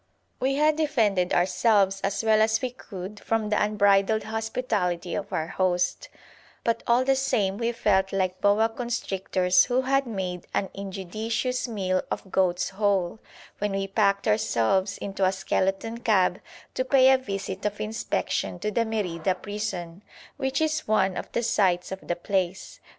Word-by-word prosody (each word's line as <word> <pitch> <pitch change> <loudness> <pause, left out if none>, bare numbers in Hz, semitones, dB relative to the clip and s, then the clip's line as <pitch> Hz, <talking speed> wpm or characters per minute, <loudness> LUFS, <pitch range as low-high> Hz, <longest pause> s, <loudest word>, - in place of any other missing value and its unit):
We 270 +1 +1
had 300 +1 +3
defended 220 - +1
ourselves 195 +1 +2
as 195 +3 -1
well 220 -1 +4
as 220 0 +3
we 255 -1 -3
could 200 -4 -9
from 225 -2 -1
the 210 - +2
unbridled 205 0 +3
hospitality 220 -6 -2
of 205 - -4
our 160 - -1
host, 180 0 -1 0.5
but 230 - 0
all 240 +2 +3
the 270 0 +3
same 205 -7 0
we 235 0 0
felt 190 -4 +1
like 185 -1 -1
boa 205 +2 +4
constrictors 195 -6 +1
who 250 +1 +1
had 275 +1 +1
made 185 -5 -4
an 195 - -1
injudicious 215 +6 -3
meal 185 -5 -1
of 190 - -5
goats 180 -2 +1
whole, 195 -1 0 0.4
when 205 -1 -1
we 195 0 -1
packed 200 0 +1
ourselves 195 - +1
into 195 -1 -4
a 185 - +4
skeleton 195 +4 -1
cab 190 -5 +2 0.3
to 255 - 0
pay 260 0 +5
a 265 - +6
visit 195 -4 -5
of 210 0 -2
inspection 215 +1 -2
to 210 - -3
the 230 +2 +1
Merida 185 -5 -1
prison, 195 -3 -5 0.4
which 265 +2 -1
is 310 0 0
one 190 -3 +2
of - - -6
the 235 - 0
sights 185 -6 +1
of 190 - -4
the 175 - 0
place. 190 0 -2
205 Hz, 160 wpm, -26 LUFS, 190-225 Hz, 0.5 s, a